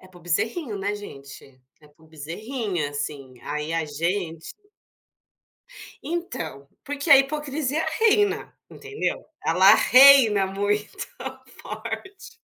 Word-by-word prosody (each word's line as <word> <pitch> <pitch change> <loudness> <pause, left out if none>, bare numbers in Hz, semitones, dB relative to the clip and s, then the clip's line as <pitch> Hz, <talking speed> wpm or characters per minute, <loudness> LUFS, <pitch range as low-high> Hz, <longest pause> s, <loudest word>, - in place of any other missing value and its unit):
é 185 - -17
para 185 -1 -17
o - - -19
bezerrinho, 220 - -2
né, 200 +2 -2
gente, 140 -8 -12 0.2
é 150 - -19
para 150 +2 -25
o - - -20
bezerrinha, 175 - -4
assim, 145 -2 -6
aí 150 +2 -4
a 165 -1 0
gente 165 +2 -4 1.5
Então, 165 - -5 0.2
porque 290 +2 -4
a 280 - +11
hipocrisia 295 +1 -1
reina, 420 -2 +2 0.2
entendeu, 430 0 -4 0.2
ela 185 +4 +6
reina 255 -7 +6
muito 205 +2 -1 0.7
forte. 395 +5 -8
200 Hz, 115 wpm, -24 LUFS, -, 1.5 s, a